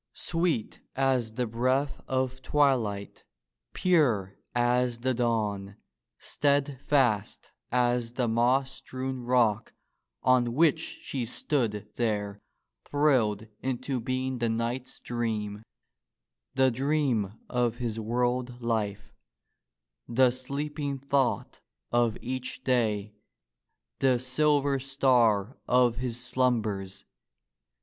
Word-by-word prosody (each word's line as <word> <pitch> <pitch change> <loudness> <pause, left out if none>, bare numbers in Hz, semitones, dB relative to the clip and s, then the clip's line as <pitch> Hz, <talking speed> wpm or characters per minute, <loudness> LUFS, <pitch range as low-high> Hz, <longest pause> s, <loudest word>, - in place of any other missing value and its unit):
Sweet 165 -9 -1
as 130 -4 +1
the 125 +2 -1
breath 130 +5 0
of 130 0 -1
twilight, 125 -9 +1 0.5
pure 125 - +2 0.2
as 120 0 +2
the 130 +1 +1
dawn, 105 -5 -1 0.4
steadfast 140 -6 0 0.2
as 120 -1 +1
the 125 -1 0
moss 125 +4 +2
strewn 130 0 -5
rock 120 -4 +1 0.5
on 125 -2 +3
which 160 -1 +4 0.2
she 130 -3 -3
stood 115 -3 -1
there 105 -3 -1 0.4
thrilled 125 -8 +2 0.2
into 130 0 -2
being 130 +1 -2
the 115 -1 +1
knight's 120 +3 -3
dream, 110 -3 -3 0.9
the 130 -1 +4
dream 130 -6 0
of 120 -2 0
his 115 -2 -3
world 120 +2 -1
life, 105 -4 -2 0.9
the 125 +1 +4
sleeping 140 +2 -3
thought 135 -2 0 0.3
of 120 -2 +2
each 130 +1 -4
day, 110 -5 +1 0.9
the 130 -2 +4
silver 140 +2 +2
star 125 -5 +2
of 125 -2 +3
his 125 -1 -3
slumbers. 110 -6 -1
125 Hz, 95 wpm, -28 LUFS, 115-130 Hz, 0.9 s, which